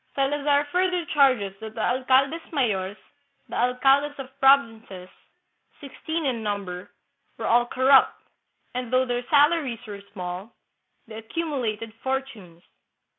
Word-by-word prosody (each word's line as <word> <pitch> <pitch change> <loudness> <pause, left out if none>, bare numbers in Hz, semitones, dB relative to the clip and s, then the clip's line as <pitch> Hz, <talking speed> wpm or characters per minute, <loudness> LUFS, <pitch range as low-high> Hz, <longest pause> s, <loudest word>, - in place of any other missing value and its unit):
Salazar 285 +1 +1
further 360 -1 0
charges 255 -9 +3
that 220 0 -9
the - - -7
alcaldes 265 +6 +2
mayores 205 - -1 0.5
(the - - -7
alcaldes 270 +4 +2
of 270 -1 -8
provinces), 225 -9 +2 0.7
sixteen 315 +3 -5
in 245 -4 -1
number, 200 -4 -4 0.5
were - - -5
all 240 +1 +3
corrupt, 260 +2 +4 0.5
and, 250 -1 -4
though 255 0 +3
their 245 -1 -2
salaries 290 -5 +2
were 205 -2 -8
small, 185 +2 -7 0.5
they 220 -2 -10
accumulated 230 -5 -4
fortunes. 245 -11 -5
255 Hz, 120 wpm, -24 LUFS, 220-280 Hz, 0.7 s, corrupt